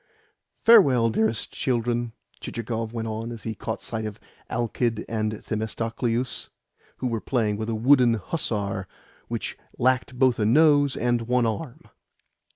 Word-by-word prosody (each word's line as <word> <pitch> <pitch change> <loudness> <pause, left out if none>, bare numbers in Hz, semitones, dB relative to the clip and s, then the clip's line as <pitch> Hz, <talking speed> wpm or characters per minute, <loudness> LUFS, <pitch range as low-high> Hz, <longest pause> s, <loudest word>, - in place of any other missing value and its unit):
"Farewell, 135 - +6
dearest 110 0 0
children," 120 -2 -1 0.3
Chichikov 115 -1 -4
went 115 -1 -4
on 110 +1 -4
as 115 -3 -8
he 110 - -3
caught 110 0 -5
sight 110 -1 -3
of 105 0 -8 0.3
Alkid 120 -1 -1
and 110 -1 -1
Themistocleus, 115 +3 -2 0.5
who - - -5
were 115 -3 -1
playing 110 -5 0
with 110 +2 -4
a 115 - -1
wooden 125 0 +5
hussar 100 - -2 0.4
which - - -3 0.2
lacked 130 0 +1
both 130 -2 +3
a 105 - +2
nose 145 +1 +4
and 120 -1 0
one 125 -1 +2
arm. 115 +6 -4
115 Hz, 140 wpm, -25 LUFS, 110-125 Hz, 0.5 s, Farewell